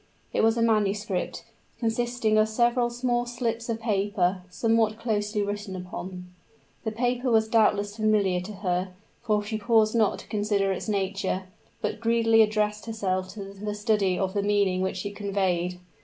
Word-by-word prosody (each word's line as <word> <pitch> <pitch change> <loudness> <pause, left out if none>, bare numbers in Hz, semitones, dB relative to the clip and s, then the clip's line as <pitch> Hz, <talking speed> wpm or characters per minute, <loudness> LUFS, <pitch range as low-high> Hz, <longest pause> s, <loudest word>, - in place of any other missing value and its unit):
It - - +2
was 225 +1 +3
a 230 - +2
manuscript, 205 -3 0 0.3
consisting 235 -1 0
of 215 0 +3
several 240 +2 +2
small 240 0 -1
slips 235 -1 -3
of 225 -1 -1
paper, 200 -4 +1
somewhat 225 +2 +1
closely 210 -2 -1
written 205 -1 -4
upon. 180 0 -7 0.6
The 220 - -2
paper 245 +3 0
was 220 -1 +3
doubtless 210 -2 +2
familiar 205 -4 +2
to 185 +4 -7
her; 180 +1 -1 0.3
for 210 -3 +1
she 215 +1 -3
paused 220 0 +3
not 220 -3 +3
to - - -12
consider 205 -2 0
its 190 - -3
nature, 195 -1 -1 0.4
but - - -2
greedily 225 0 +4
addressed 210 0 +1
herself 185 -4 -1
to 195 -2 -7
the 210 +1 -4
study 205 -3 +1
of 190 -1 -1
the 205 - +1
meaning 200 -2 +2
which 190 +1 -2
it 205 0 -5
conveyed. 185 -3 -1
210 Hz, 160 wpm, -26 LUFS, 195-225 Hz, 0.6 s, greedily